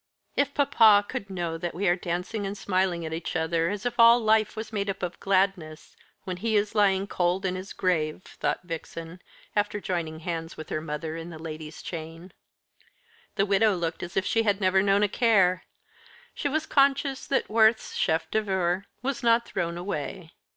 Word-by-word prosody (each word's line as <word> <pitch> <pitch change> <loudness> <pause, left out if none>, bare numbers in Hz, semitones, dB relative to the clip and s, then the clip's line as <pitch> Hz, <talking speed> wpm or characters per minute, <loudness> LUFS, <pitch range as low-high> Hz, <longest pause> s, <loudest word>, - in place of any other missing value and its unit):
"If 285 0 0
papa 220 -7 +5
could 200 - -5
know 170 -3 -3
that 175 -1 -4
we 195 +3 0
are 175 - +4
dancing 180 +4 -3
and 200 +1 -5
smiling 185 -3 0
at 160 - -4
each 165 +2 -4
other, 165 0 +1
as 205 +2 -4
if 245 0 -3
all 230 +1 +8
life 220 -2 +2
was 220 0 -6
made 200 -1 -1
up 195 - -4
of 175 -1 -4
gladness, 185 -5 0 0.3
when 185 -1 -4
he 220 +3 -1
is 205 +1 +1
lying 200 -3 +3
in 180 0 0
his 185 +1 -7
cold - - -9
grave!" 165 -2 0
thought - - -3
Vixen, 165 +1 -7 0.3
after 205 0 0
joining 165 -5 -3
hands 165 0 -5
with 155 - -8
her 155 - -2
mother 155 +1 -4
in 165 +1 -7
the 165 - -8
ladies' 155 -1 -8
chain. 165 +2 -8 1.0
The 195 - +2
widow 205 +1 +3
looked 170 -2 -3
as 175 +1 -6
if 190 - +1
she 225 - +2
had 205 -2 +1
never 190 -1 +3
known 200 +1 +3
a - - +4
care. 195 -5 +3 0.7
She 285 - -2
was 315 +2 -1
conscious 275 -1 +2
that 275 - 0
Worth's 220 0 +3
chef 160 -1 0
d'oeuvre 190 -3 0 0.2
was 270 -1 -2
not 235 0 +3
thrown 170 -4 -3
away. 175 -1 -5
190 Hz, 185 wpm, -27 LUFS, 170-210 Hz, 1.0 s, all